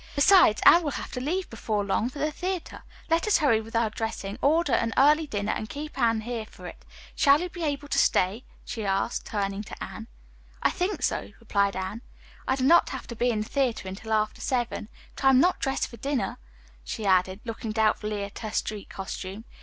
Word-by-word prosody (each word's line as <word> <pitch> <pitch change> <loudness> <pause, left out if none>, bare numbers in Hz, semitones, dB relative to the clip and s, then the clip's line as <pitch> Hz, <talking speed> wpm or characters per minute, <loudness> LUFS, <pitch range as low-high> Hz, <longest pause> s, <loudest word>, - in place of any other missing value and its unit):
Besides, 290 - +6
Anne 345 - +9
will 310 - -2
have - - -7
to 250 - -4
leave 355 +8 -1
before 215 -2 -2
long 215 +4 0
for 260 - -11
the 300 +2 0
theatre. 360 +2 -4 0.3
Let 330 +4 +2
us 425 - +5
hurry 265 -8 +3
with 225 +1 -10
our 230 -2 +2
dressing, 220 -1 -4
order 300 -1 +3
an 230 -1 +1
early 300 +3 +5
dinner 205 -4 -2
and 215 - -4
keep 300 +1 -6
Anne 230 -1 +2
here 225 -1 -4
for - - -14
it. - - -9 0.3
Shall 280 +1 +5
you 360 +2 -3
be 345 -1 -7
able 290 -1 -2
to - - +2
stay?" 195 +7 +2 0.2
she 225 - -5
asked, 195 +3 -1
turning 200 -1 -2
to 210 - -8
Anne. 220 - -8 0.6
"I - - +4
think 375 +3 -2
so," - - -1
replied 200 -4 +1
Anne. 190 +4 -4 0.5
"I 260 - +2
do 260 - -2
not 335 +6 +5
have - - -6
to 235 - -5
be 245 +2 +1
in 220 -3 0
the 215 - -5
theatre 255 -8 0
until 195 +4 -7
after 215 0 0
seven. 240 -4 -2 0.3
But - - -5
I - - +8
am 260 -1 +6
not 360 +5 +3
dressed 270 0 -1
for 235 - -12
dinner," 275 +3 -2 0.4
she 215 - -5
added, 185 0 +2
looking 225 -1 -4
doubtfully 215 -1 0
at 200 - -7
her 220 - -5
street 210 -1 -3
costume. 195 +2 -6
230 Hz, 215 wpm, -27 LUFS, 210-285 Hz, 0.6 s, Anne